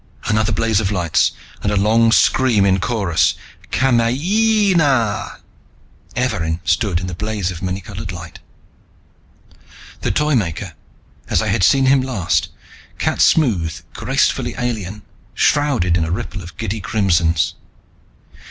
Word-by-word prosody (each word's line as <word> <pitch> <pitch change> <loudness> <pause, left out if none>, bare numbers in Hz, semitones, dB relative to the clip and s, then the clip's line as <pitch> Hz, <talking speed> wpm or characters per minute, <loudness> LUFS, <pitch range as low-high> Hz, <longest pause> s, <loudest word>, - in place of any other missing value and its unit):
Another 110 0 +1
blaze 110 -1 +1
of 100 -2 -1
lights 90 -5 +1 0.3
and - - -8
another 100 -1 +1
long 115 +2 +4
scream 115 -4 +3
in 95 -1 +2
chorus: 90 - +1 0.4
"Kamayeeeeeeeeeeeeeeeeeeena!" 145 - +1 0.7
Evarin 80 0 -1
stood 100 -5 +1
in 90 - -5
the 90 - -5
blaze 100 0 -3
of 90 - -7
the 95 - -5
many 95 +1 -3
colored 100 +1 -7
light. 85 -2 -9 1.6
The - - -1
Toymaker, 115 - -1 0.6
as - - +2
I - - -2
had - - 0
seen 135 +10 +4
him 135 0 +4
last, 125 -9 -1 0.5
cat - - -1
smooth, 90 - +2
gracefully - - 0
alien, 105 -5 -4 0.3
shrouded 135 - +2
in 85 - +1
a 80 - -3
ripple 95 +2 -4
of 85 -3 -11
giddy 110 -1 -3
crimsons. 85 -5 +1
105 Hz, 130 wpm, -18 LUFS, 90-120 Hz, 1.6 s, long